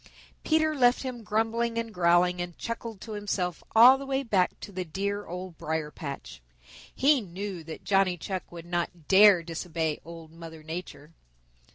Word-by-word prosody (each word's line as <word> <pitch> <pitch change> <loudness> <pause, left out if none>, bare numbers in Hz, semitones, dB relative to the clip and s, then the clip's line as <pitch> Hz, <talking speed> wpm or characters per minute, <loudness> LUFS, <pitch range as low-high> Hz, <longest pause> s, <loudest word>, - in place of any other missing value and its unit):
Peter 315 0 +2
left 245 -2 +3
him 255 -3 -5
grumbling 225 +2 0
and 230 -1 -3
growling, 180 0 +3
and 175 -1 -6
chuckled 230 -2 -5
to 225 - -9
himself 200 -5 -3
all 250 +4 +9
the 275 - -6
way 270 0 0
back 190 -7 +1
to - - -9
the 185 -1 -3
dear 200 +5 -3
Old 180 -1 -7
Briar 155 -1 -3
patch. 140 - -8 0.5
He 280 0 +4
knew 190 -2 -6
that 160 -1 -8
Johnny 195 -2 +2
Chuck 185 +3 -5
would 170 -1 -9
not 175 -2 -3
dare 195 -2 +7
disobey 165 -2 -3
Old 165 -1 -11
Mother 165 -1 -11
Nature. 160 -2 -8
185 Hz, 165 wpm, -28 LUFS, 170-225 Hz, 0.5 s, all